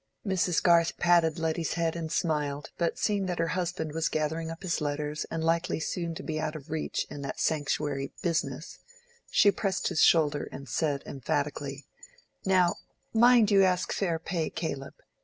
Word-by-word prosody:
Mrs. 185 Hz, -3 st, +1 dB
Garth 170 Hz, -2 st, +4 dB
patted 170 Hz, -2 st, +3 dB
Letty's 160 Hz, 0 st, -1 dB
head 165 Hz, -1 st, 0 dB
and 160 Hz, -2 st, -4 dB
smiled, 150 Hz, -3 st, -1 dB
but 170 Hz, -1 st, 0 dB
seeing 200 Hz, -3 st, 0 dB
that 180 Hz, -1 st, -2 dB
her 165 Hz, 0 st, 0 dB
husband 175 Hz, -2 st, -2 dB
was 165 Hz, 0 st, 0 dB
gathering 160 Hz, +1 st, -1 dB
up 165 Hz, +3 st, -8 dB
his 170 Hz, -3 st, -1 dB
letters 150 Hz, 0 st, -2 dB
and 165 Hz, -1 st, -3 dB
likely 165 Hz, +1 st, +1 dB
soon 170 Hz, +1 st, -3 dB
to -, -, -7 dB
be 155 Hz, -1 st, -3 dB
out 155 Hz, 0 st, -2 dB
of 150 Hz, 0 st, -9 dB
reach 160 Hz, -1 st, -2 dB
in 145 Hz, -, -6 dB
that 140 Hz, -, -5 dB
sanctuary 145 Hz, -2 st, -1 dB
"business," 170 Hz, -2 st, -2 dB, 0.5 s
she 205 Hz, -, +5 dB
pressed 195 Hz, -1 st, -1 dB
his 180 Hz, -4 st, +1 dB
shoulder 150 Hz, -3 st, +3 dB
and 140 Hz, -, -8 dB
said 140 Hz, +3 st, -1 dB
emphatically— 140 Hz, +1 st, -3 dB, 0.6 s
"Now, 185 Hz, -2 st, +3 dB, 0.4 s
mind 230 Hz, -1 st, +6 dB
you 200 Hz, -1 st, +6 dB
ask 185 Hz, -1 st, +1 dB
fair 175 Hz, -5 st, 0 dB
pay, 165 Hz, 0 st, -2 dB
Caleb." 140 Hz, -5 st, -5 dB
165 Hz, 170 wpm, -28 LUFS, 150-175 Hz, 0.6 s, mind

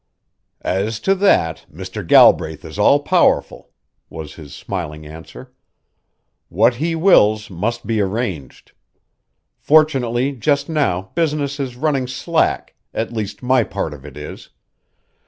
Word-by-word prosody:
"As 105 Hz, +4 st, -1 dB
to 195 Hz, -, +2 dB
that, 185 Hz, -, +1 dB
Mr. 95 Hz, +6 st, -7 dB
Galbraith 80 Hz, -3 st, +4 dB
is -, -, -9 dB
all -, -, +4 dB
powerful," -, -, +1 dB, 0.4 s
was 80 Hz, -2 st, -8 dB
his 75 Hz, -4 st, -12 dB
smiling 80 Hz, -5 st, -6 dB
answer. 80 Hz, +2 st, -12 dB, 1.0 s
"What 115 Hz, +6 st, +2 dB
he 165 Hz, +4 st, -1 dB
wills 110 Hz, -, +3 dB
must 115 Hz, +7 st, -3 dB
be 110 Hz, -2 st, 0 dB
arranged. 95 Hz, -, -4 dB, 0.9 s
Fortunately 135 Hz, -4 st, +2 dB
just 140 Hz, +3 st, 0 dB
now 95 Hz, -, -1 dB
business 150 Hz, -4 st, -1 dB
is 130 Hz, -3 st, -4 dB
running 135 Hz, -1 st, -1 dB
slack, 160 Hz, +6 st, -1 dB, 0.2 s
at 115 Hz, +1 st, -3 dB
least 110 Hz, +1 st, -5 dB
my 130 Hz, -1 st, +3 dB
part 95 Hz, -6 st, -4 dB
of 70 Hz, -2 st, -12 dB
it 75 Hz, -1 st, -11 dB
is. 75 Hz, 0 st, -9 dB
110 Hz, 125 wpm, -19 LUFS, 90-140 Hz, 1.0 s, Galbraith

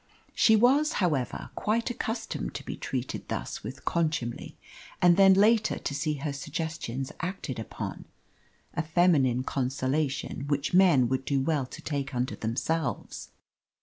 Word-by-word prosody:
She 220 Hz, -, +5 dB
was, 275 Hz, +8 st, +4 dB
however, 150 Hz, -10 st, -1 dB
quite 230 Hz, +3 st, 0 dB
accustomed 230 Hz, -1 st, -4 dB
to -, -, -6 dB
be -, -, -4 dB
treated -, -, -4 dB
thus -, -, -4 dB
with -, -, -8 dB
contumely, 155 Hz, -8 st, -1 dB, 0.4 s
and 175 Hz, -1 st, +6 dB
then 195 Hz, 0 st, +7 dB
later 215 Hz, +2 st, +4 dB
to -, -, -4 dB
see 150 Hz, +1 st, -1 dB
her 145 Hz, 0 st, -3 dB
suggestions 145 Hz, -3 st, -4 dB
acted 170 Hz, -, -4 dB
upon 110 Hz, -, -6 dB, 0.7 s
a -, -, 0 dB
feminine 155 Hz, -7 st, +3 dB
consolation 135 Hz, +2 st, -1 dB
which 145 Hz, +2 st, -1 dB
men 175 Hz, -9 st, +6 dB
would 130 Hz, 0 st, 0 dB
do 135 Hz, +1 st, 0 dB
well 140 Hz, -1 st, 0 dB
to -, -, -10 dB
take 140 Hz, -2 st, -3 dB
unto 125 Hz, +1 st, -1 dB
themselves. 135 Hz, +8 st, -2 dB
150 Hz, 140 wpm, -28 LUFS, 135-180 Hz, 0.7 s, then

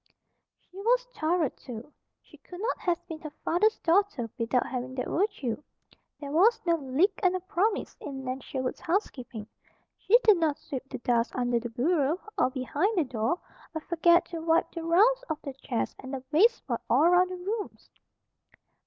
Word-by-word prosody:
She 365 Hz, -, -19 dB
was -, -, +2 dB
thorough, 320 Hz, -2 st, +1 dB
too. 245 Hz, +4 st, -10 dB, 0.3 s
She -, -, -18 dB
could 355 Hz, -, -12 dB
not 450 Hz, +5 st, -1 dB
have 350 Hz, -2 st, -1 dB
been 320 Hz, -1 st, -6 dB
her 310 Hz, -, -7 dB, 0.2 s
father's 425 Hz, +6 st, +3 dB
daughter 335 Hz, -, +1 dB
without 240 Hz, +2 st, +1 dB
having 255 Hz, 0 st, -4 dB
that 255 Hz, -, -2 dB
virtue. 295 Hz, -, -1 dB, 0.6 s
There 285 Hz, -2 st, -6 dB
was 385 Hz, +10 st, +4 dB
no 340 Hz, -, +3 dB
"lick 290 Hz, +7 st, +1 dB
and 370 Hz, -2 st, +3 dB
a -, -, 0 dB
promise" 400 Hz, +3 st, -1 dB
in 270 Hz, -2 st, -6 dB
Nan 255 Hz, +1 st, -3 dB
Sherwood's 260 Hz, 0 st, -4 dB
housekeeping. 255 Hz, -, -3 dB, 0.5 s
She 460 Hz, -, +5 dB
did 425 Hz, -4 st, +6 dB
not 315 Hz, -4 st, +1 dB
sweep 270 Hz, -1 st, -7 dB
the 260 Hz, -, -5 dB
dust 235 Hz, -1 st, 0 dB
under 245 Hz, -1 st, +1 dB
the 240 Hz, +1 st, -5 dB
bureau, 290 Hz, +6 st, +1 dB, 0.2 s
or -, -, +3 dB
behind 290 Hz, -, -1 dB
the 340 Hz, -, +4 dB
door, 245 Hz, +5 st, -1 dB, 0.4 s
or 315 Hz, -, -2 dB
forget 340 Hz, +1 st, +4 dB
to 335 Hz, -, -4 dB
wipe 330 Hz, +1 st, +2 dB
the 335 Hz, -, -5 dB
rounds 420 Hz, +10 st, +4 dB
of 315 Hz, -2 st, -2 dB
the 275 Hz, -, -5 dB
chairs 260 Hz, -3 st, -3 dB
and 260 Hz, +1 st, -6 dB
the 260 Hz, -, -5 dB
baseboard 320 Hz, -, +3 dB
all 255 Hz, +6 st, +4 dB
around 355 Hz, +2 st, +5 dB
the 370 Hz, -, -5 dB
rooms. 405 Hz, +4 st, -5 dB
320 Hz, 180 wpm, -28 LUFS, 260-365 Hz, 0.6 s, did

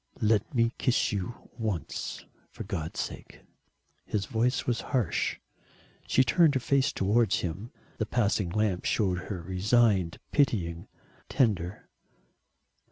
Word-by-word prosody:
"Let 105 Hz, -1 st, +2 dB
me 115 Hz, -2 st, +2 dB
kiss 125 Hz, -3 st, +2 dB
you 100 Hz, +3 st, -5 dB
once, 105 Hz, -7 st, -3 dB, 0.2 s
for -, -, -8 dB
God's 90 Hz, -6 st, -4 dB
sake," -, -, -6 dB, 0.6 s
his 100 Hz, -2 st, -2 dB
voice 120 Hz, +4 st, 0 dB
was 120 Hz, -2 st, 0 dB, 0.2 s
harsh. 120 Hz, -, 0 dB, 0.7 s
She 130 Hz, -, +4 dB
turned 145 Hz, +5 st, +4 dB
her -, -, +3 dB
face 135 Hz, +2 st, +2 dB
towards 110 Hz, +4 st, +2 dB
him. 95 Hz, +7 st, -5 dB, 0.3 s
The 110 Hz, -, -1 dB
passing 105 Hz, -5 st, +1 dB
lamp 100 Hz, -1 st, 0 dB
showed 95 Hz, -5 st, +1 dB
her 90 Hz, -5 st, -4 dB
resigned, 95 Hz, 0 st, +2 dB
pitying, 90 Hz, -, +1 dB, 0.4 s
tender. 105 Hz, -, 0 dB
105 Hz, 120 wpm, -28 LUFS, 95-120 Hz, 0.7 s, She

